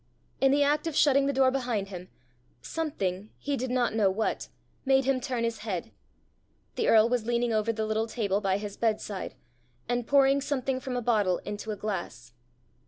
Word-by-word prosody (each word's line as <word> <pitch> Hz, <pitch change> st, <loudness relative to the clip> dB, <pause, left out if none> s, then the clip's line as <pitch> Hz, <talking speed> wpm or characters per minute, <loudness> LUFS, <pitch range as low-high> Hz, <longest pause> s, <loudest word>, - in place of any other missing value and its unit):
In 270 Hz, 0 st, +4 dB
the 285 Hz, +1 st, +4 dB
act 295 Hz, +3 st, +1 dB
of 320 Hz, -, -3 dB
shutting 275 Hz, -2 st, +4 dB
the -, -, +2 dB
door 265 Hz, -1 st, +3 dB
behind 240 Hz, -7 st, -2 dB
him, 180 Hz, -1 st, -8 dB, 0.5 s
something, 210 Hz, -, -3 dB
he 285 Hz, 0 st, -2 dB
did 260 Hz, -1 st, -3 dB
not 245 Hz, -2 st, +1 dB
know 215 Hz, -3 st, +3 dB
what, 215 Hz, +3 st, -1 dB, 0.4 s
made 270 Hz, -1 st, +3 dB
him 265 Hz, -1 st, +1 dB
turn 250 Hz, -3 st, -2 dB
his 230 Hz, -1 st, -1 dB
head: 195 Hz, -6 st, -4 dB, 0.8 s
the -, -, -1 dB
earl 220 Hz, 0 st, +6 dB
was 235 Hz, -2 st, -1 dB
leaning 240 Hz, -1 st, +1 dB
over 215 Hz, +1 st, +1 dB
the 220 Hz, -1 st, -2 dB
little 220 Hz, +1 st, 0 dB
table 210 Hz, -3 st, -1 dB
by 195 Hz, -1 st, +1 dB
his 205 Hz, -1 st, -6 dB
bedside, 215 Hz, -3 st, -2 dB, 0.5 s
and 245 Hz, 0 st, -1 dB
pouring 275 Hz, 0 st, +4 dB
something 270 Hz, -2 st, -1 dB
from 255 Hz, -1 st, -4 dB
a 245 Hz, -, -2 dB
bottle 210 Hz, -6 st, +2 dB
into 210 Hz, +1 st, -5 dB
a 215 Hz, -, -1 dB
glass. 195 Hz, -, -5 dB
235 Hz, 185 wpm, -28 LUFS, 210-270 Hz, 0.8 s, earl